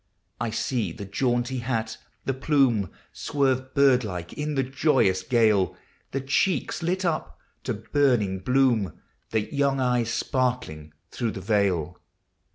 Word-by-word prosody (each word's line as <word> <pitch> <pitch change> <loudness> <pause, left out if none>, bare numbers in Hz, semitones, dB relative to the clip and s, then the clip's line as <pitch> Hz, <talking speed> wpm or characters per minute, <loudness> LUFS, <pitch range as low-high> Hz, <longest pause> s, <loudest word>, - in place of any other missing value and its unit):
I 120 0 -1
see 115 +1 -1
the 105 -3 -7
jaunty 120 +4 0
hat, 115 -2 -2 0.3
the 135 - 0
plume 130 - +2 0.2
Swerve 130 -2 -1
bird 135 -3 +5
like 90 -5 -5
in 150 0 -3
the 135 - +2
joyous 130 -8 +2
gale, 110 -4 +2 0.2
— - - -38
The 135 - -2
cheeks 150 +8 0
lit 185 +3 -1
up 75 - -2 0.3
to - - -1
burning 110 -4 +1
bloom, 125 -2 +1 0.3
The 110 +2 -2
young 140 -1 +1
eyes 125 -3 +1
sparkling 120 - -2 0.2
through 115 -3 -2
the 95 - -6
veil. 95 -5 0
125 Hz, 140 wpm, -25 LUFS, 105-135 Hz, 0.3 s, bird